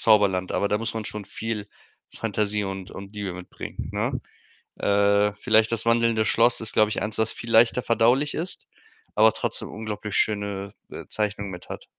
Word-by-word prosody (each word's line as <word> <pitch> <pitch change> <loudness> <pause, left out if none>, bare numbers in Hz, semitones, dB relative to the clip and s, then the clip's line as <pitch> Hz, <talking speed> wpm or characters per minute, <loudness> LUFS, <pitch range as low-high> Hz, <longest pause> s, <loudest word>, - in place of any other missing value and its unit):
Zauberland, 100 -4 +3
aber 100 - +1
da 105 - +1
muss 115 0 -3
man 110 -1 -3
schon 105 0 -4
viel 105 -1 -4 0.5
Fantasie 105 -1 -1
und 95 -1 -5
und 100 +1 -9
Liebe 100 -3 -4
mitbringen, 90 0 -7
ne? - - -1 0.6
Äh, 100 0 +3
vielleicht 110 0 +3
das 115 -1 -1
wandelnde 115 -1 +3
Schloss 115 +3 +3
ist, 110 - -2
glaube 110 -1 +4
ich, - - -2
eins, 105 0 -2
was 110 0 +2
viel 115 -1 -7
leichter 115 +2 +5
verdaulich 125 +5 +3
ist, 175 +3 -2 0.5
aber 110 0 +6
trotzdem - - -3
unglaublich 105 -1 -5
schöne, 100 -2 0 0.2
äh, - - -7
Zeichnungen 105 -2 -1
mit 90 - -9
hat. - - -7
105 Hz, 175 wpm, -25 LUFS, 100-115 Hz, 0.6 s, aber